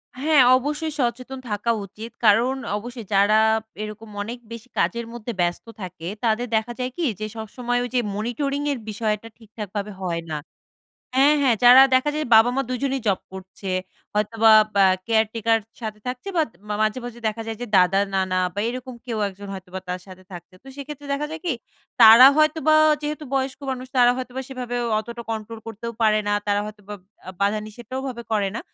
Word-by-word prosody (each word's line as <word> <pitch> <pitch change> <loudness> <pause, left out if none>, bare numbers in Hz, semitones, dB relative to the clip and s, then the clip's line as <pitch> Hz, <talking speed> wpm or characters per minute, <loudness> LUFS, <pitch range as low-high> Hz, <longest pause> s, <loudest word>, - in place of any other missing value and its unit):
হ্যাঁ, 290 +2 +4 0.2
অবশ্যই 295 +4 -3
সচেতন 255 +1 -2
থাকা 210 +3 0
উচিত। 215 +4 -10
কারণ 230 +5 +4 0.2
অবশ্যই 235 +1 -8
যারা 205 +2 +5 0.4
এরকম 215 +1 -8
অনেক 230 +4 -5
বেশি 230 +1 -9
কাজের 235 0 0
মধ্যে 240 0 -5
ব্যস্ত 175 0 -1 0.2
থাকে 170 -2 -7 0.2
তাদের 235 +1 +1
দেখা 220 +2 0
যায় 250 0 -2
কি 345 - 0
যে, 215 - -3
সবসময় 245 +3 -2
ওই 245 - -4
যে - - +4 0.2
মনিটরিং 275 +6 -2
এর 275 - -3
বিষয়টা 215 0 -2
ঠিকঠাকভাবে 210 -2 -6
হয় 170 -2 -2
না 155 - -1 0.8
হ্যাঁ, 280 +3 +5
হ্যাঁ, 255 -4 +4
যারা 250 +2 +10
দেখা 260 +3 +2
যায়, 305 0 -1
বাবা-মা 245 +4 +5
দুইজনেই 265 +1 -1
জব 195 -2 +2
করছে। 190 +1 -8 0.4
হয়তোবা 220 +2 +3 0.2
বা 200 - +5
অ্যা 185 - +3
কেয়ারটেকার 225 0 +2 0.2
সাথে 215 -1 -5
থাকছে 250 +8 -5
বা 330 - +4
দ - - -40 0.3
মাঝে, 215 +3 +1
মাঝে 240 -1 -8
দেখা 220 +1 -3
যায় 225 -1 -4
যে, - - -2
দাদা, 185 +1 +4 0.2
নানা 185 -1 +1
বা 205 - -4
এরকম 255 +1 -6
কেউ 235 -3 -3
একজন 200 +1 -11
হয়তোবা 190 -1 -7
তার 180 0 -2
সাথে 185 0 -13
থাকছে। 175 +1 -10
তো - - -16
সেক্ষেত্রে 290 0 -8
দেখা 285 +2 -2
যায় 320 - -6
কি, 340 - +1 0.5
তারা 230 +3 +10
হয়তোবা 310 0 +3 0.3
যেহেতু 300 +1 -4
বয়স্ক 265 -1 -1
মানুষ, 255 0 -5
তারা 245 -1 +6
হয়তোবা 255 0 -5
সেভাবেও 245 -2 -4 0.2
অতটা 235 +2 -7
কন্ট্রোল 220 0 -5
করতেও 225 +1 -6
পারে 215 -1 +4
না। 205 - +2
তারা 205 0 +2
হয়তোবা 210 -1 -9 0.3
আ - - -4
বাধা-নিষেধটাও 215 +5 -2
ওভাবে 250 -3 -5
করে 205 -3 +1
না। - - -2
230 Hz, 180 wpm, -23 LUFS, 210-255 Hz, 0.8 s, যারা